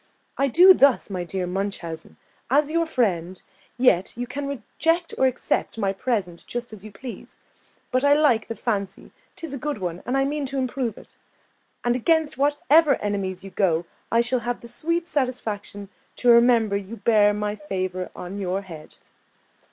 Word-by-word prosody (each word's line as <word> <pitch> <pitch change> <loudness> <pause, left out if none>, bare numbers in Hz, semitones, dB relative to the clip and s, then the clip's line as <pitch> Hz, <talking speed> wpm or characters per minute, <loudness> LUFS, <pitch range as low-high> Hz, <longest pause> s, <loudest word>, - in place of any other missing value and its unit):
I 275 - +1
do 360 +8 +8
thus, 275 - +3
my 180 -2 -2
dear 180 +1 -3
Munchausen, 180 -3 -5 0.3
as 290 +3 +3
your 335 0 +1
friend, 185 - -1 0.4
yet 230 -6 +2
you 245 - -2
can 280 +3 -5
reject 325 +6 -1
or 265 - +3
accept 255 -2 -1
my 195 -3 0
present 195 -6 -2
just 240 -1 -5
as 205 -3 -10
you 215 - -10
please; 240 +5 -10 0.5
but 255 +1 +1
I 285 0 +5
like 285 -7 +3
the 230 - -5
fancy, 200 -5 -3 0.2
'tis 325 -4 -7
a 275 - -4
good 295 +1 -3
one, 180 -2 -4
and 255 +2 +1
I 270 - +2
mean 290 0 -2
to 275 +1 -4
improve 255 -3 -2
it: - - -16 0.7
and 240 0 +2
against 320 +4 +1
whatever 290 +2 +4
enemies 195 -3 -3
you 195 - -9
go, 175 -4 +1 0.3
I 230 - +4
shall 245 +1 0
have 240 +1 -4
the 235 - -10
sweet 335 +8 -2
satisfaction 215 -7 -3 0.3
to 245 - +1
remember 235 -3 +5
you 200 +3 -5
bear 210 -3 +4
my 210 0 -2
favour 185 -3 -4
on 185 +3 -7
your 190 +1 -2
head!" 160 -5 -11
235 Hz, 175 wpm, -24 LUFS, 195-275 Hz, 0.7 s, do